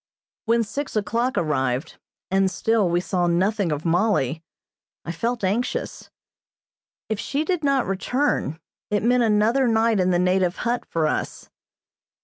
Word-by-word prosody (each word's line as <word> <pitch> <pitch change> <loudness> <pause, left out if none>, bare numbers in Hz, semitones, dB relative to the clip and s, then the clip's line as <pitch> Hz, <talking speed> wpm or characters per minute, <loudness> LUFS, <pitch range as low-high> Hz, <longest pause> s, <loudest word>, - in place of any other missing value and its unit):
When 230 0 +2
six 280 +6 -5
o'clock 235 +5 0
arrived, 135 -4 -1 0.3
and 195 0 +3
still 215 0 +1
we 175 +1 +2
saw 180 -1 0
nothing 190 +2 +1
of 150 +2 -3
Mollie, 165 - +1 0.6
I 170 - -3
felt 230 +7 -2
anxious. 210 +7 -2 1.0
If 220 -2 -2
she 290 +6 -2
did 355 -3 -1
not 275 -2 +2
return 195 - -1 0.3
it 210 0 0
meant 245 +1 +3
another 225 +4 +3
night 225 -1 +2
in 185 0 +2
the 180 - +3
native 180 0 +2
hut 240 +1 -1
for 165 -2 0
us. - - -3
205 Hz, 140 wpm, -23 LUFS, 175-235 Hz, 1.0 s, and